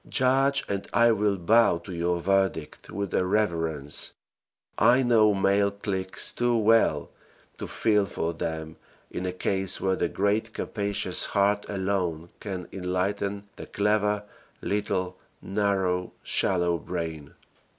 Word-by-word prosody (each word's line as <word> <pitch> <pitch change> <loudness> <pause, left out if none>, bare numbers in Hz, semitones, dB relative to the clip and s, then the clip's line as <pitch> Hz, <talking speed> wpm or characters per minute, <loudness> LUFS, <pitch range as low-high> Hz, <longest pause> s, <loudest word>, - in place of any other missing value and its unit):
Judge 135 +1 +3
and 100 -1 -3
I 115 0 +5
will 105 -2 +1
bow 105 +1 +4
to 85 +2 -9
your 85 +1 0
verdict 95 -4 0
with 100 -2 -4
a - - +2
reverence 80 -7 0 0.6
I 125 +2 +4
know 110 -4 +4
male 100 +1 +3
cliques 100 -2 -2
too 120 -1 +1
well 110 -9 +3 0.5
to - - -4
feel 105 -3 +1
for 85 -2 -2
them 80 -1 -5 0.3
in 90 - -3
a - - -1
case 95 +1 0
where 95 -1 +1
the 85 - -1
great 105 +4 0
capacious 100 -3 -2
heart 100 0 +1
alone 95 -4 -2
can 95 -4 -5
enlighten 100 +2 -2
the - - -8
clever, 105 0 +1 0.4
little, 100 -3 -2 0.2
narrow, 95 -3 -1
shallow 85 -3 +1
brain. 80 -4 -5
100 Hz, 130 wpm, -26 LUFS, 90-105 Hz, 0.6 s, I